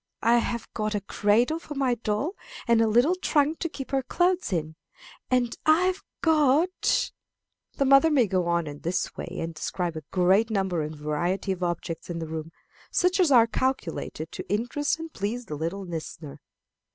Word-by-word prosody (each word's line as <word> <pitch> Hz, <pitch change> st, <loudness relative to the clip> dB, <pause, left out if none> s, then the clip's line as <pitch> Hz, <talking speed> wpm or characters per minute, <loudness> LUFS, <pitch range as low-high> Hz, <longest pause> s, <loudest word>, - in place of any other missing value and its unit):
I 230 Hz, +2 st, +5 dB
have 235 Hz, -1 st, -3 dB
got 215 Hz, -1 st, -2 dB
a 205 Hz, -, -1 dB
cradle 225 Hz, -, +2 dB
for 300 Hz, -3 st, -9 dB
my 270 Hz, -3 st, +1 dB
doll, 235 Hz, -, -2 dB, 0.3 s
and 235 Hz, -1 st, +4 dB
a 225 Hz, -, +4 dB
little 240 Hz, +10 st, +4 dB
trunk 315 Hz, -4 st, +1 dB
to 335 Hz, -, -2 dB
keep 270 Hz, -3 st, -8 dB
her 270 Hz, -1 st, +2 dB
clothes 355 Hz, -, +1 dB
in. 160 Hz, -3 st, -2 dB, 0.5 s
And 245 Hz, -2 st, +1 dB
I 315 Hz, +3 st, +5 dB
have 370 Hz, +1 st, 0 dB, 0.2 s
got 315 Hz, +3 st, +2 dB, 0.3 s
" -, -, -56 dB
The 275 Hz, -, +2 dB
mother 275 Hz, +4 st, +6 dB
may 275 Hz, -6 st, +4 dB
go 185 Hz, -3 st, 0 dB
on 170 Hz, -1 st, +1 dB
in 145 Hz, -1 st, -7 dB
this 175 Hz, +4 st, -2 dB
way, -, -, -6 dB
and 165 Hz, 0 st, -3 dB
describe 170 Hz, +2 st, -3 dB
a 155 Hz, -, -5 dB
great 190 Hz, +5 st, +3 dB
number 190 Hz, -5 st, 0 dB
and 155 Hz, +1 st, -4 dB
variety 150 Hz, +7 st, -1 dB
of 185 Hz, -1 st, -4 dB
objects 175 Hz, -1 st, -3 dB
in 170 Hz, -, -3 dB
the 165 Hz, -, -4 dB
room, 160 Hz, 0 st, -6 dB, 0.4 s
such 360 Hz, +2 st, +2 dB
as 355 Hz, -4 st, +4 dB
are 235 Hz, -3 st, +7 dB
calculated 230 Hz, -, -2 dB
to -, -, -8 dB
interest 245 Hz, +9 st, 0 dB
and 325 Hz, -1 st, -8 dB
please 225 Hz, +5 st, -3 dB
the 155 Hz, -, -7 dB
little 170 Hz, +6 st, -3 dB
listener. 160 Hz, -3 st, -7 dB
220 Hz, 190 wpm, -26 LUFS, 175-280 Hz, 0.5 s, are